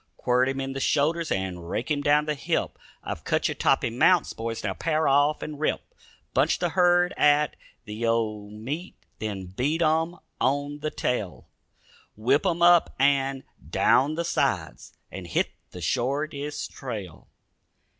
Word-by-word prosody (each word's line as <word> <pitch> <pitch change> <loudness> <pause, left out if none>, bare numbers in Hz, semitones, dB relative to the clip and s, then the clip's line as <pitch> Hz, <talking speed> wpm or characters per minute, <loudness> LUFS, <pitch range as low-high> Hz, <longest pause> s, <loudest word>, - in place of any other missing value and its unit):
Quirt 125 +1 +2
him 135 0 -3
in 135 0 -3
the 135 - -4
shoulders 155 +4 +1
and 90 -3 -3
rake 125 - -3
him 145 -1 +1
down 145 +1 +3
the 150 - 0
hip; 140 - -2 0.2
I've - - -5
cut - - +1
you - - -2
toppy - - +1
mounts, 165 +8 +3
boys, 115 0 -5
now 100 -3 -1
pair 155 - 0
off 145 +2 +3
and 150 -1 -6
rip. 155 - -2 0.4
Bunch - - +2
the 175 - 0
herd 175 0 +3
at 150 0 +3 0.3
the 105 +2 -6
old 110 -3 -1
meet, 140 - -6 0.2
Then 100 -3 -4
beat 150 +8 0
'em 160 +2 +1 0.2
on 145 +2 0
the 155 +1 -2
tail; 110 -10 -3 0.7
Whip 130 - +2
'em 170 -1 0
up 175 -1 +5
and 135 -1 +2 0.3
down 145 +4 +3
the 170 +1 -2
sides 170 - -2
And - - -7
hit - - 0 0.2
the 90 - -10
shortest 140 - -2
trail." 105 - -7
140 Hz, 155 wpm, -26 LUFS, 115-155 Hz, 0.7 s, up